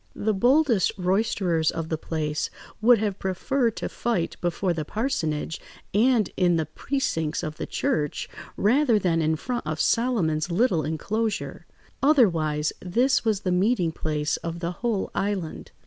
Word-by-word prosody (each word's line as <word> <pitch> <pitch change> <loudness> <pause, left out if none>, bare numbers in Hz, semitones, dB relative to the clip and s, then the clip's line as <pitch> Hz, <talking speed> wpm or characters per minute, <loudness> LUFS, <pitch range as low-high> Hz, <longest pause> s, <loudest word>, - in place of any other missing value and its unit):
The 215 +1 0
boldest 245 - +3
roisterers 180 -3 +1
of 165 -1 -4
the 160 - -1
place 155 -2 -2 0.3
would 240 +2 +6
have 205 -2 -2
preferred 230 +5 0
to - - -3
fight 225 -8 -2
before 175 +1 0
the 160 -2 -3
parsonage 165 - -2 0.3
and 225 0 +3
in 180 -2 +3
the 160 -1 0
precincts 160 - -2
of 155 -2 -5
the - - -4
church 150 -2 -1 0.3
rather 240 +3 +3
than 170 -4 +1
in 160 0 +2
front 240 +3 -4
of 155 0 -3
Solomon's 185 -10 +1
little 175 -3 +2
enclosure. 210 +8 -2 0.3
Otherwise, 165 - +3
this 240 +9 +1
was 215 -3 +1
the 185 - -1
meeting 180 -1 +2
place 150 -2 -1
of 170 0 -5
the 170 0 -3
whole 215 +1 -2
island. 195 -5 -3
185 Hz, 150 wpm, -25 LUFS, 160-230 Hz, 0.3 s, would